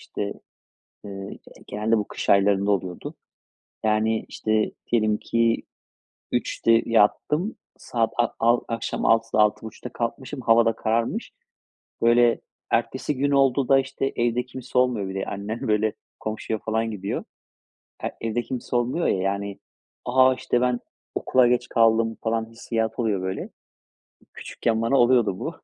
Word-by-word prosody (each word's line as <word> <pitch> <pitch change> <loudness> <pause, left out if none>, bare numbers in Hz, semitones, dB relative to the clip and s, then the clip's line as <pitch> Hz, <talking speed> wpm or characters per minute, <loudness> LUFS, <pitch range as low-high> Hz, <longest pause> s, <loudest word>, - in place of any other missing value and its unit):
şte, 100 0 -4 0.7
eee, 100 -1 -7
g - - -15 0.3
genelde 110 +2 +1
bu 105 - -2
kış - - -5
aylarında 100 0 +4
oluyordu. 95 -3 -3 0.7
Yani, 110 +1 +1
işte, 110 0 0 0.2
diyelim 110 -2 +3
ki 115 0 +1 0.7
3.00'te 115 0 +2
yattım. 150 - +2 0.2
Saat 115 -2 -1
a 120 - +4
al 120 +1 +4
akşam 115 0 -3
6.00'da 115 -1 +3
6.30'ta 105 +1 -1
kalkmışım, 130 +4 -4
hava 115 0 +5
da 115 - +3
kararmış. 115 +1 -1 0.7
Böyle, 120 0 +4 0.3
ertesi 150 - 0
gün 140 +2 +1
oldu 135 -1 +3
da, 135 - +6
işte 135 0 -2
Evde 120 +1 0
kimse 125 0 -6
olmuyor 125 -6 +1
bir 95 - -6
de 95 - -2
annem, 110 +6 -4
böyle, 105 0 +2 0.3
komşuya 110 0 -3
falan 110 +1 -1
gidiyor. 100 -2 -4 0.8
E - - 0
evde 115 +1 -1
kimse 125 -1 -4
olmuyor 125 +8 0
ya, - - +2
yani, 100 +1 -2 0.5
"A! 130 +1 +5
İşte, 120 -1 0
ben 125 -1 +1 0.3
okula 130 -1 +3
geç 125 0 +1
kaldım." 115 -1 +3
falan 115 0 0
hissiyatı 115 0 -3
oluyor, 105 -5 0
böyle. 95 0 -3 0.9
Küçükken 110 -1 -2
bana 115 +4 +2
oluyordu 120 -6 +3
bu. - - -4
115 Hz, 140 wpm, -24 LUFS, 105-120 Hz, 0.9 s, da